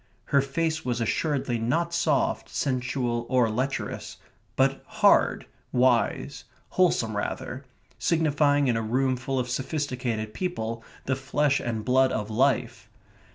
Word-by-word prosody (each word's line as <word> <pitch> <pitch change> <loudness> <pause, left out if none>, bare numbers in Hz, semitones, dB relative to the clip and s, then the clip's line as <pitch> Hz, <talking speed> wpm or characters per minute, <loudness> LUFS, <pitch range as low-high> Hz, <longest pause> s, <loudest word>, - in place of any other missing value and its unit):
Her 140 - +6
face 160 +3 -1
was 120 -1 -1
assuredly 125 +1 0
not 165 +10 0
soft, 150 -5 +1
sensual, 125 -3 -1
or 125 -3 +3
lecherous, 130 +5 -3 0.4
but - - +2
hard, - - +3 0.3
wise, 125 +2 +1 0.2
wholesome 120 - +2
rather, 130 +5 -4 0.3
signifying 145 -3 +2
in 120 - +2
a 115 - 0
room 130 +4 +1
full 130 +2 -3
of 125 -1 0
sophisticated 125 -5 -2
people 115 -11 -3 0.2
the 130 - +1
flesh 140 +1 +1
and 110 -3 -3
blood 130 +1 +4
of 105 0 -3
life. 130 +3 0
130 Hz, 125 wpm, -26 LUFS, 120-140 Hz, 0.4 s, Her